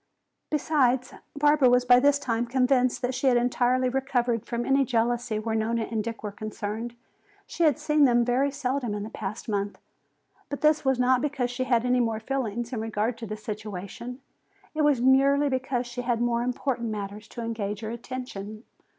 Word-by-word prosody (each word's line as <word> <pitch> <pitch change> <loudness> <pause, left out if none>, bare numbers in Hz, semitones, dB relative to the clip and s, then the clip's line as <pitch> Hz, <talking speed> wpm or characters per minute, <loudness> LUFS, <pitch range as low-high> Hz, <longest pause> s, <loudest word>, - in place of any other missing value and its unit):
Besides, 265 -4 +1 0.2
Barbara 290 -2 +4
was 250 0 +3
by 245 0 +7
this 285 +2 +4
time 240 -3 -1
convinced 255 0 +2
that 250 +1 0
she 255 +2 0
had 250 -2 +5
entirely 250 +1 +2
recovered 250 -3 0
from 240 0 -2
any 275 0 +3
jealousy 240 -2 0
where 220 +1 -2
Nona 225 +1 0
and 220 -1 -2
Dick 230 0 -6
were 210 - -3
concerned. 215 +3 -5 0.5
She 340 - 0
had 300 -2 +4
seen 300 -1 +3
them 240 -2 +4
very 255 +3 +2
seldom 265 -5 -2
in 205 - -4
the 215 - -7
past 210 +2 -6
month. 205 -2 -2 0.7
But 285 - -5
this 305 0 +3
was 265 -2 +2
not 250 0 +3
because 270 -4 -1
she 255 +1 -2
had 240 -2 +2
any 250 0 +3
more 225 -2 0
feeling 240 -2 -2
in 235 -4 -3
regard 220 +1 -1
to 225 - -6
the 215 +1 -5
situation. 215 +3 -7 0.5
It 310 - -1
was 295 -4 +3
merely 275 +3 +4
because 260 -1 -1
she 245 +1 -5
had 240 -2 0
more 235 0 +1
important 245 -1 -2
matters 210 0 -6
to 235 - -8
engage 215 -3 -3
her 220 0 -4
attention. 235 -3 -7
245 Hz, 185 wpm, -26 LUFS, 225-265 Hz, 0.7 s, by